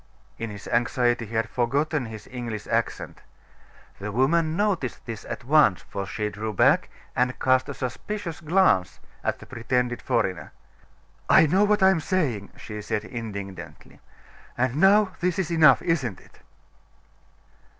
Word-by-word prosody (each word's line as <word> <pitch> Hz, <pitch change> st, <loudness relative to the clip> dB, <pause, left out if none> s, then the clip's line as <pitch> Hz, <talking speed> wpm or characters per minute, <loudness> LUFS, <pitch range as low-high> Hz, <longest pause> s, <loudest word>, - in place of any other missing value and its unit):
In 115 Hz, -, -3 dB
his 100 Hz, -1 st, -9 dB
anxiety 120 Hz, -1 st, +1 dB
he 115 Hz, -, -8 dB
had 110 Hz, -, +1 dB
forgotten 135 Hz, +2 st, 0 dB
his 110 Hz, -1 st, -9 dB
English 120 Hz, -4 st, -5 dB
accent. -, -, -2 dB, 0.8 s
The 105 Hz, +1 st, -4 dB
woman 155 Hz, +7 st, +2 dB
noticed 195 Hz, -, -1 dB
this 115 Hz, -3 st, -7 dB
at -, -, -6 dB
once, 145 Hz, -8 st, +4 dB
for 100 Hz, -1 st, -5 dB
she 105 Hz, +1 st, -3 dB
drew 110 Hz, +1 st, -4 dB
back, 140 Hz, -, +3 dB, 0.3 s
and 125 Hz, 0 st, +1 dB
cast 130 Hz, 0 st, +2 dB
a -, -, -5 dB
suspicious 170 Hz, -, -5 dB
glance 160 Hz, -, +2 dB, 0.2 s
at -, -, -1 dB
the -, -, -13 dB
pretended 120 Hz, +1 st, -1 dB
foreigner. 110 Hz, -8 st, -1 dB, 0.8 s
"I -, -, +7 dB
know 190 Hz, +7 st, +3 dB
what 210 Hz, -1 st, +2 dB
I 190 Hz, -, +7 dB
am 180 Hz, -, +1 dB
saying," 145 Hz, -, -1 dB
she 105 Hz, -1 st, -7 dB
said, 105 Hz, +1 st, -3 dB
indignantly. 100 Hz, -6 st, -8 dB, 0.6 s
"And 130 Hz, +2 st, 0 dB
now 195 Hz, +3 st, +5 dB
this 180 Hz, 0 st, 0 dB
is 180 Hz, -3 st, -1 dB
enough, 155 Hz, -5 st, +6 dB
isn't 135 Hz, -, -1 dB
it?" -, -, -21 dB
125 Hz, 150 wpm, -25 LUFS, 110-165 Hz, 0.8 s, I